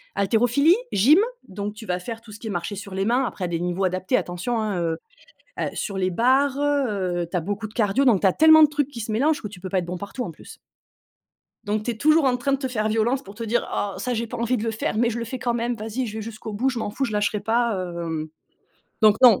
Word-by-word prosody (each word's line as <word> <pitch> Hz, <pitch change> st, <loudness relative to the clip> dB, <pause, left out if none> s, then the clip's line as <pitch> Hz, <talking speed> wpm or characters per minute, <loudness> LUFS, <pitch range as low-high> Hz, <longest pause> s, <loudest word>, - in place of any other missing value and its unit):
haltérophilie, 245 Hz, -, +3 dB, 0.2 s
gym, 275 Hz, -, +6 dB, 0.3 s
donc 200 Hz, +2 st, -4 dB
tu 220 Hz, 0 st, -10 dB
vas 180 Hz, 0 st, -1 dB
faire 225 Hz, +5 st, -7 dB
tout 225 Hz, -2 st, -14 dB
ce 210 Hz, -, -9 dB
qui 220 Hz, -, -6 dB
est -, -, -4 dB
marcher 175 Hz, +2 st, -3 dB
sur 200 Hz, 0 st, -8 dB
les 195 Hz, +1 st, -1 dB
mains, 250 Hz, +3 st, +2 dB
après 195 Hz, -, -4 dB
à 175 Hz, -, -1 dB
des 170 Hz, -1 st, -2 dB
niveaux 180 Hz, +2 st, -1 dB
adaptés 185 Hz, +6 st, +1 dB
attention, 185 Hz, +7 st, -2 dB
hein, 210 Hz, -4 st, -1 dB
heu, 165 Hz, -1 st, -1 dB, 0.6 s
ah, -, -, -1 dB
sur 195 Hz, -3 st, -3 dB
les 185 Hz, 0 st, +1 dB
barres, 260 Hz, +7 st, +2 dB
heu 290 Hz, -2 st, +2 dB, 0.4 s
heu, 170 Hz, -, -5 dB
tu -, -, -2 dB
as -, -, +1 dB
beaucoup 205 Hz, +5 st, -4 dB
de 215 Hz, -, -19 dB
cardio, 235 Hz, +4 st, +2 dB
donc 215 Hz, -7 st, +4 dB
tu -, -, +4 dB
as 190 Hz, -, +5 dB
tellement 315 Hz, -, +7 dB
de 300 Hz, -, +7 dB
trucs 290 Hz, -2 st, -1 dB
qui 265 Hz, -5 st, -8 dB
se 220 Hz, 0 st, -4 dB
mélangent, 290 Hz, +7 st, +1 dB
que 210 Hz, -, -4 dB
tu 190 Hz, -3 st, -12 dB
peux 185 Hz, -, -5 dB
pas 190 Hz, -, 0 dB
être -, -, -6 dB
bon 180 Hz, 0 st, -4 dB
partout, 220 Hz, +6 st, -5 dB
en 175 Hz, -, -5 dB
plus 160 Hz, -, -13 dB, 1.1 s
donc 210 Hz, +1 st, -1 dB
tu 240 Hz, -, -1 dB
es -, -, -9 dB
toujours 310 Hz, +5 st, +4 dB
en 250 Hz, -2 st, +3 dB
train 260 Hz, +3 st, -1 dB
de 275 Hz, -, +2 dB
te 265 Hz, -1 st, -3 dB
faire 215 Hz, -3 st, -1 dB
violence 225 Hz, +5 st, +1 dB
pour 200 Hz, -, -12 dB
te 230 Hz, +2 st, -6 dB
dire: 230 Hz, +2 st, 0 dB
«Oh 200 Hz, -1 st, -2 dB
ça, 250 Hz, -, -2 dB
j'ai 230 Hz, 0 st, -2 dB
pas -, -, -6 dB
envie 235 Hz, +2 st, 0 dB
de 215 Hz, -, -3 dB
le 225 Hz, -, 0 dB
faire 220 Hz, -1 st, -2 dB
mais 235 Hz, 0 st, +3 dB
je 235 Hz, -, -3 dB
le 230 Hz, -, -3 dB
fais 255 Hz, +3 st, -5 dB
quand 240 Hz, -2 st, -1 dB
même, 235 Hz, +1 st, -1 dB
vas-y, 225 Hz, +4 st, -3 dB
je 220 Hz, +1 st, -6 dB
vais -, -, -4 dB
jusqu'au 220 Hz, 0 st, -7 dB
bout, 240 Hz, +6 st, 0 dB
je 250 Hz, -, -2 dB
m'en 220 Hz, -, -3 dB
fous 270 Hz, +6 st, -2 dB
je 235 Hz, -, -3 dB
lâcherai 210 Hz, 0 st, 0 dB
pas». 230 Hz, +1 st, +1 dB
Heu, 175 Hz, -2 st, -4 dB
hem, 160 Hz, -2 st, -3 dB, 0.7 s
donc 215 Hz, -1 st, +6 dB
non 240 Hz, -6 st, +8 dB
220 Hz, 290 wpm, -24 LUFS, 195-250 Hz, 1.1 s, non